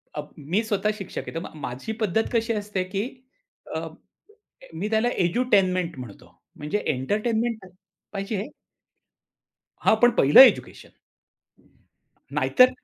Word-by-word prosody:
अ, 150 - -2 0.2
मी 165 +9 0
स्वतः 210 -1 0
शिक्षक 195 -4 -6
आहे - - -5
तर - - -1
मग 165 - -9
माझी 130 - -5
पद्धत 215 +1 +1
कशी 230 0 +1
असते, 205 -3 -2
की 185 +2 -3 0.7
अ, - - -3 0.9
मी 195 +6 -3
त्याला 220 +2 +2 0.2
एज्युटेनमेंट 185 - +1
म्हणतो. 115 -6 -11 0.2
म्हणजे 150 +8 -3
एंटरटेनमेंट 220 - 0
तर 190 - -13 0.4
पाहिजे 195 +2 -3
आहे. 200 - -4 1.3
हां, - - +4
पण 245 0 +6
पहिलं 145 - +8
एज्युकेशन. 265 - +3 1.3
हं. - - -15
नाहीतर 255 -1 +5
205 Hz, 130 wpm, -24 LUFS, 170-220 Hz, 1.3 s, पहिलं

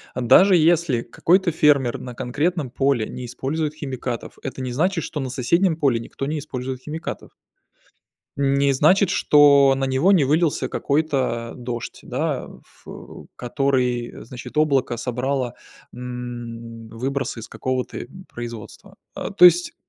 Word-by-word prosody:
даже 180 - +5
если 165 -6 +3
какой-то 175 +9 +1
фермер 140 -6 +2
на 125 -1 -8
конкретном 145 +5 -1
поле 135 -4 +1
не 125 - -7
использует 145 +5 -3
химикатов, 130 -5 -6
это 135 0 -5
не 130 -1 -3
значит, 165 +6 0
что 150 - -5
на 135 -2 -3
соседнем 160 +8 +1
поле 140 -7 +1
никто 115 +4 -6
не 150 +2 -2
использует 130 -3 -5
химикатов. 155 +4 -7 1.0
Не 140 0 +2
значит, 170 +8 +4
что 140 -5 +5
на 135 0 -1
него 135 +8 +2
не 180 -7 +5
вылился 155 +3 +1
какой-то 135 -6 -1
дождь, 120 -2 -6
да, - - -2
ф - - -26
э, - - -8 0.4
который, 125 -2 -1
значит, 125 +4 -9
облако 140 -5 +2
собрало, 125 +1 -2 0.4
м, 120 -2 -7
выбросы 135 +1 -3
из 115 - -9
какого-то, 130 -1 -3
э, - - -6 0.2
производства. 120 -3 -9 0.2
А - - -5
то 195 -3 +7
есть, 175 0 +5
135 Hz, 140 wpm, -22 LUFS, 125-155 Hz, 1.0 s, то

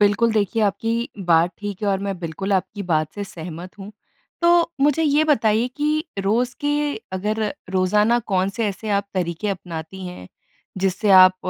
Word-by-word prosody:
बिल्कुल, 205 +3 +3
देखिए, 215 +1 +1
आपकी 225 +3 0 0.2
बात 170 0 +4
ठीक 205 0 -6
है 205 - +1
और 195 -1 +2
मैं 195 -3 -3
बिल्कुल 180 +4 -3
आपकी 195 +2 -1
बात 155 0 +1
से 205 -1 -4
सहमत 180 0 -9
हूँ, 200 +2 -9 0.5
तो 340 0 +4
मुझे 295 +3 +3
ये 300 +1 +3
बताइए 230 -5 +2
कि 305 +1 0
रोज़ 230 +6 +1
के 290 0 0 0.4
अगर 210 +4 -1 0.3
रोज़ाना 210 +5 +3 0.2
कौन 185 +1 +2
से 225 - +1
ऐसे 200 +3 -6
आप 200 0 0
तरीके 175 +2 -2
अपनाती 180 0 -6
हैं, 135 - -9 0.5
जिससे 195 +2 +1
आप 185 -1 +8
200 Hz, 165 wpm, -22 LUFS, 185-225 Hz, 0.5 s, आप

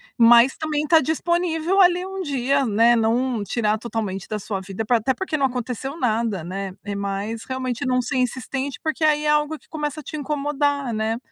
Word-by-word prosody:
Mas 235 +2 +6
também 305 -1 -1
tá 325 -1 +6
disponível 340 +4 0
ali 360 0 +4
um 385 0 -5
dia, 275 -2 0
né, 230 +3 +4
não 230 0 +1
tirar 215 0 0
totalmente 210 -5 -4
da 215 - -3
sua 195 -1 -4
vida 195 +3 -5
pra 240 +1 +3
até 225 +4 0
porque 380 -5 -3
não 275 - +2
aconteceu 255 +4 -5
nada, 220 -6 0
né, 190 +2 -5
é 205 - -4
mais 200 +3 -3
realmente 255 -2 -3
não 255 0 +1
ser 250 +1 -2
insistente, 260 +2 -2
porque 315 0 -2
aí 300 -1 +3
é - - +2
algo 300 +1 +1
que - - -27
começa 300 -1 -4
a - - -19
te 310 - -7
incomodar, 285 -2 -1
né. 220 +1 -1
255 Hz, 195 wpm, -22 LUFS, 225-300 Hz, -, Mas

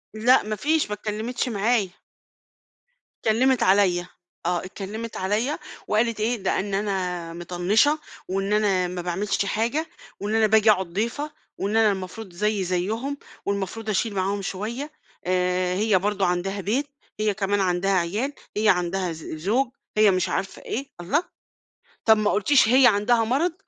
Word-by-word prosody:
لا 245 +4 +4
ما 215 0 -3
فيش 310 +6 +1
ما - - -2
اتكلّمِتش 220 +4 -3
معايا. 210 -1 +1 1.4
اتكلّمت 250 +3 +3
عليَّ، 190 -2 +4 0.4
آه 175 +1 0
اتكلّمت 210 +4 -6
عليَّ 215 +10 0 0.3
وقالت 225 +1 +1
إيه، 230 +3 +1
ده 190 - +1
إن 200 +1 -3
أنا 180 -4 -2
مطنّشة، 180 - +2 0.3
وإن 195 +2 -1
أنا 195 -4 +2
ما 180 0 -4
باعملش 190 +3 -1
حاجة، 235 +11 -1 0.3
وإن 210 +2 -2
أنا 220 -1 +4
باجي 220 0 +5
أقعد 190 -3 +1
ضيفة، 235 - -2 0.3
وإن 205 +3 0
أنا 220 -2 +5
المفروض 190 +1 -6
زيي 210 +1 0
زيهم، 220 +11 -2 0.3
والمفروض 200 +2 -3
أشيل 215 +1 0
معاهم 195 +1 0
شوية، 235 +11 -4 0.3
آآ 180 0 +1
هي 210 0 +3
برضه 200 0 0
عندها 180 +3 -1
بيت، 245 +10 0 0.3
هي 215 -1 +2
كمان 200 0 0
عندها 185 +1 +1
عيال، 195 +10 0 0.2
هي 215 0 +3
عندها 180 0 +1
ز 160 -1 -8
زوج، 215 - +1 0.3
هي 215 -1 +6
مش 185 -1 0
عارفة 195 - -3
إيه، 270 +4 -4
الله! 290 - +1 0.8
طب 220 -1 +6
ما 210 -1 +2
قُلتيش 240 +3 +4
هي 255 +1 +7
عندها 225 +2 +3
مرض، 280 +10 +1
205 Hz, 150 wpm, -24 LUFS, 185-225 Hz, 1.4 s, هي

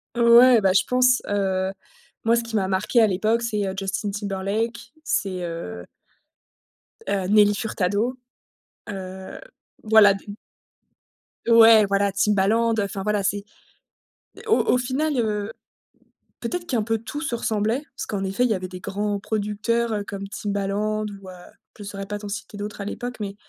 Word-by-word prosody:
Ouais, 235 0 +7
bah, 190 -1 +3
je 195 - +4
pense. 250 0 +3
Heu, 190 -2 0 0.5
moi 230 +1 +3
ce 235 - 0
qui 230 -1 -6
m'a 190 -2 +1
marqué 195 +5 +2
à 220 - +5
l'époque, 215 +5 +1
c'est 210 -4 -1
heu, 190 - -3
Justin 195 +1 -2
Timberlake, 205 +3 -2 0.3
c'est 185 - -1
heu 90 - -6 1.2
heu, 195 -2 -1
Nelly 205 0 +5
Furtado. 215 +4 -1 0.7
Heu, 190 -2 -7 0.4
voilà 215 -2 +6
d 195 - -7 1.3
Ouais, 225 -2 +7
voilà, 200 0 +1
Timbaland 210 +4 +2
enfin 200 -1 -3
voilà 210 -1 0
c'est 205 +1 -1 1.0
au 445 - +4
au - - +2
final, 275 +5 -1
heu, 215 -2 -1 0.9
peut - - -4
être 355 -1 -3
qu'un 245 -9 0
peu 225 +1 0
tout 240 +7 -7
se 260 -6 -2
ressemblait 225 +4 -1
parce - - -5
qu'en 195 -2 -3
effet 195 +6 0
il 250 - +2
y 215 - +2
avait 185 0 -5
des 180 0 -9
grands 205 +1 -2
producteurs, 220 +3 -1
heu, 205 - -2
comme 200 -1 -6
Timbaland 205 +1 -2 0.2
ou 190 - -11
heu, - - -9 0.4
je 205 - -9
saurais 195 -1 -7
pas 205 - -4
t'en 205 0 -8
citer 205 0 -6
d'autres 205 0 -6
à - - -5
l'époque, 245 +4 -5
mais 200 -1 -5
205 Hz, 165 wpm, -23 LUFS, 195-230 Hz, 1.3 s, Ouais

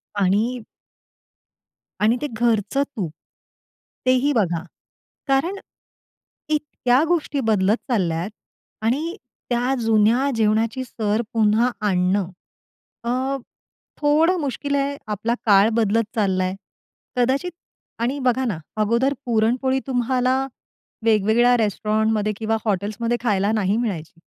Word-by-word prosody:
आणि 210 +5 +1 1.4
आणि 220 +3 +3
ते 295 - -1
घरचं 235 +2 +1
तूप, 220 - -5 0.9
तेही 255 +3 +3
बघा 175 - 0 0.6
कारण 275 +8 +1 0.9
इतक्या 295 -3 +1
गोष्टी 315 -4 0
बदलत 205 +1 +3
चालल्यात 175 -4 0 0.6
आणि 305 +10 0 0.3
त्या 245 +2 +1
जुन्या 225 +4 +3
जेवणाची 225 +3 +1
सर 220 -3 -1
पुन्हा 225 +2 +3 0.2
आणणं 185 0 +1 0.7
अ, 260 +3 -1 0.6
थोडं 315 +5 +3
मुश्किल 285 -1 -2
आहे, 280 0 0
आपला 215 +2 -1
काळ 205 0 +6
बदलत 225 0 +2
चाललाय. 185 -3 +1 0.6
कदाचित 265 +8 +1 0.5
आणि 245 +5 0
बघा 260 0 +1
ना, 210 -9 -1 0.2
अगोदर 235 +6 +2
पुरणपोळी 245 +3 +1
तुम्हाला 255 0 +1 0.7
वेगवेगळ्या 225 +3 +4
रेस्टॉरंटमध्ये 215 0 0
किंवा 225 0 0
हॉटेल्समध्ये 215 +4 -1
खायला 205 -3 +2
नाही 210 -1 +1
मिळायची. 180 -8 -4
230 Hz, 100 wpm, -22 LUFS, 210-260 Hz, 1.4 s, काळ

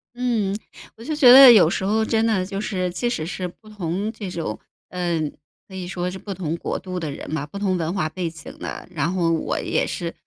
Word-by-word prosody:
嗯， 230 -6 0 0.4
我 225 - -12
就 310 +4 -3
觉 270 -5 +7
得 265 0 +11
有 210 -8 +7
时 175 - -2
候 220 +3 +1
真 220 0 +1
的 200 -5 +1
就 195 +1 -4
是， 185 -4 -2
即 240 +7 -1
使 160 -10 -2
是 180 +1 -4
不 195 +5 -16
同 200 0 -3
这 210 -4 -7
种， 165 -11 -4 0.3
嗯， 170 -4 -2 0.3
可 190 - -15
以 185 -1 -5
说 180 -1 -3
是 190 - -7
不 205 - -8
同 165 -3 -3
国 - - -3
度 185 -1 -5
的 160 -3 -4
人 140 - -8
嘛， 145 -2 -2
不 175 - -9
同 195 -2 0
文 165 -1 -2
化 175 -6 0
背 170 +1 -3
景 160 -1 -11
的， - - -6
然 165 -1 -1
后 175 -3 +1
我 165 - -1
也 - - 0
是， 170 -2 -4
185 Hz, 250 characters per minute, -22 LUFS, 170-215 Hz, 0.4 s, 得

